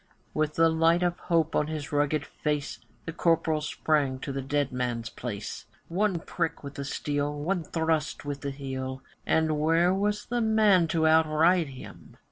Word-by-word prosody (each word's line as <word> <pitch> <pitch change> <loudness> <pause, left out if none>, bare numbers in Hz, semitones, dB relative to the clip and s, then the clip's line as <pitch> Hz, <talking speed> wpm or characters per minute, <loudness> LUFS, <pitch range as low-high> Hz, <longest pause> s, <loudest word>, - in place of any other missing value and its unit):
With 155 0 0
the 165 0 +5
light 165 +2 +3
of 175 0 0
hope 165 -2 +1
on 150 - +2
his 155 -2 -5
rugged 145 0 +1
face, 150 -1 -3 0.3
The 165 - -5
Corporal 165 -2 +1
sprang 150 -3 0
to - - -4
the 135 0 -3
dead 140 +1 -1
man's 120 -2 -2
place, 105 -4 -6 0.2
One 190 +1 +1
prick 165 -1 -3
with 140 -1 -7
the 140 - -5
steel, 145 +1 -2
one 175 +3 -1
thrust 160 -3 -1
with 145 -1 -4
the 140 - -3
heel, 130 -1 -5 0.2
And 160 -1 +2
where 165 +4 +3
was 205 +2 0
the 240 0 -1
man 215 -6 +4
to 160 0 +1
outride 160 +2 +4
him? 130 -2 -12
155 Hz, 170 wpm, -27 LUFS, 145-165 Hz, 0.3 s, the